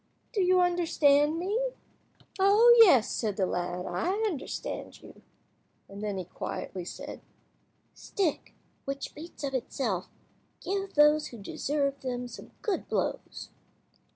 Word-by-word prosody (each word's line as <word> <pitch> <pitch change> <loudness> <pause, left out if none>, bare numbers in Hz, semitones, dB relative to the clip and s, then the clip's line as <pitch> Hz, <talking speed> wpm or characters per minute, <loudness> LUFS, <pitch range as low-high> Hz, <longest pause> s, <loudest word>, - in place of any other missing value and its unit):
Do 415 - +1
you 365 0 +4
understand 320 -4 +3
me?" 390 +7 -1 0.8
"Oh 425 +5 +7
yes," 270 - +7
said 210 -4 -2
the 190 - +2
lad, 180 0 -3
"I 260 - -1
understand 345 -11 -4
you;" - - -14 0.7
and 200 +1 -10
then 205 -2 -2
he 185 - -4
quietly 180 0 -6
said— - - -8 0.7
"Stick, 370 -7 -2 0.3
which 275 0 -4
beats 315 0 -10
of 275 -1 -2
itself, 230 -7 -2 0.5
give 390 +1 -3
those 300 +1 +5
who 235 - -10
deserve 275 +6 -2
them 250 -1 -3
some - - -11
good 415 -5 -1
blows." - - -3
290 Hz, 125 wpm, -29 LUFS, 220-360 Hz, 0.8 s, Oh